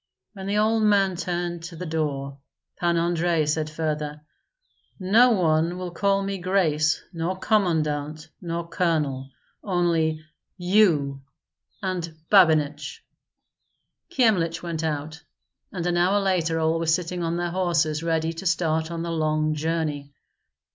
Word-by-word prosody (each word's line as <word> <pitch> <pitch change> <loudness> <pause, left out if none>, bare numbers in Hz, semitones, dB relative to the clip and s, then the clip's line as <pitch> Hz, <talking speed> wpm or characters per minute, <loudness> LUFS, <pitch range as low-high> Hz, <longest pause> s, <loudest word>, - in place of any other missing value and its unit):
When 195 -2 -7
the 205 +1 0
old 220 +1 +2
man 200 -3 +3
turned 175 -1 -3
to 170 0 -8
the 180 - -6
door, 140 -4 -3 0.4
Pan 170 -1 +1
Andrei 170 -1 +1
said 155 +1 -1
further, 150 -1 -3 0.8
"No 215 +7 +5
one 170 -4 +2
will 180 -1 -5
call 195 +3 +1
me 195 0 -3
grace 160 -5 +1
nor 170 +3 -2
commandant 155 -7 0
nor 170 -1 -4
colonel, 150 -7 -1 0.3
only 165 -4 0 0.3
you 175 -8 +2 0.6
and 175 -4 -3
Babinich." 155 -6 +3 1.1
Kyemlich 190 - +1
went 165 -2 -3
out, 155 0 -3 0.5
and 175 -3 -4
an 175 0 +1
hour 185 +4 +3
later 175 -4 0
all 160 +1 +1
were 165 - -2
sitting 175 +2 0
on 170 0 -1
their 175 0 -2
horses 170 -4 0
ready 165 0 0
to 185 +4 -4
start 160 -2 0
on 170 -1 -4
the 170 - -3
long 155 -1 0
journey. 155 -2 -2
165 Hz, 135 wpm, -24 LUFS, 155-180 Hz, 1.1 s, No